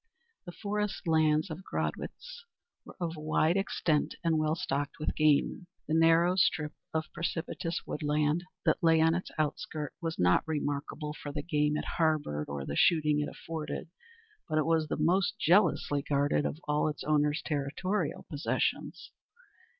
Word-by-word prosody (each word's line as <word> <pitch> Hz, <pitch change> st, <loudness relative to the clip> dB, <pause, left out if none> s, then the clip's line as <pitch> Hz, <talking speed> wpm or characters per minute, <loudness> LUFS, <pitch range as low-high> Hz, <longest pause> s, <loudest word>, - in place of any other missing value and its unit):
The -, -, -5 dB
forest 210 Hz, -1 st, -3 dB
lands 155 Hz, +1 st, +3 dB
of 165 Hz, +4 st, -6 dB
Gradwitz 475 Hz, -, -5 dB, 0.4 s
were -, -, -12 dB
of 170 Hz, -2 st, -2 dB
wide 155 Hz, +2 st, +1 dB
extent 170 Hz, -5 st, 0 dB
and 165 Hz, -2 st, +2 dB
well 155 Hz, 0 st, +1 dB
stocked 145 Hz, -5 st, -2 dB
with 155 Hz, -, -1 dB
game; 155 Hz, +4 st, +2 dB, 0.2 s
the 155 Hz, -, -1 dB
narrow 165 Hz, +2 st, +5 dB
strip 150 Hz, -4 st, +2 dB, 0.2 s
of 160 Hz, 0 st, -3 dB
precipitous 165 Hz, 0 st, -3 dB
woodland 150 Hz, +2 st, 0 dB, 0.2 s
that -, -, +2 dB
lay 165 Hz, -2 st, +5 dB
on 160 Hz, +1 st, +4 dB
its 180 Hz, +2 st, -3 dB
outskirt 155 Hz, 0 st, -2 dB
was 165 Hz, -1 st, -3 dB
not 90 Hz, 0 st, +4 dB
remarkable 150 Hz, 0 st, -3 dB
for 145 Hz, -1 st, -7 dB
the 145 Hz, 0 st, -4 dB
game 150 Hz, -2 st, +1 dB
it -, -, -3 dB
harboured 150 Hz, -, 0 dB
or 70 Hz, -1 st, -4 dB
the 70 Hz, -, -4 dB
shooting 150 Hz, -, +4 dB
it 150 Hz, -, -1 dB
afforded, 160 Hz, 0 st, -6 dB, 0.6 s
but 155 Hz, -, 0 dB
it 155 Hz, -, +2 dB
was 160 Hz, -1 st, +2 dB
the -, -, -2 dB
most 175 Hz, +5 st, +2 dB
jealously 165 Hz, -5 st, +3 dB
guarded 145 Hz, 0 st, +1 dB
of -, -, -5 dB
all 150 Hz, +1 st, +2 dB
its 150 Hz, -, -4 dB
owner's 150 Hz, 0 st, +1 dB
territorial 155 Hz, +5 st, -2 dB
possessions. 145 Hz, 0 st, -2 dB
155 Hz, 155 wpm, -30 LUFS, 150-165 Hz, 0.6 s, narrow